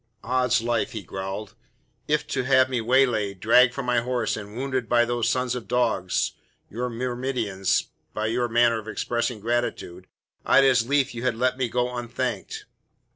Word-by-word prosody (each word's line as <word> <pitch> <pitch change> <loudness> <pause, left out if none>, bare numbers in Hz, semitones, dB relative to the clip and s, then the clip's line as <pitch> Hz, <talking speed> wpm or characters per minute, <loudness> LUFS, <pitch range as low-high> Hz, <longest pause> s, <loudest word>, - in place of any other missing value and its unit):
"Oddslife," 125 -1 +1
he 110 -3 -5
growled, 95 +4 -6 0.5
"if 150 0 +1
to 130 - 0
have 130 0 +3
me 125 -2 0
waylaid, 110 -5 +2
dragged 125 +3 +5
from 140 - -4
my 125 -1 +2
horse 120 -1 -1
and 105 +1 -8
wounded 130 -3 -2
by 120 -1 +4
those 120 -1 0
sons 125 0 0
of 125 -2 -6
dogs, 115 -7 0 0.4
your 125 +3 -3
myrmidons, 120 -5 -1 0.3
be 110 +1 -1
your 120 +1 0
manner 120 0 +3
of 110 - -11
expressing 120 +1 -2
gratitude, 105 -5 -3 0.4
I'd 140 - +5
as 125 -4 +3
lief 140 -1 +1
you 120 - -6
had 125 -2 0
let 125 +2 +1
me 130 -2 -1
go 125 +1 -1
unthanked." 125 - -4
120 Hz, 165 wpm, -25 LUFS, 110-125 Hz, 0.5 s, dragged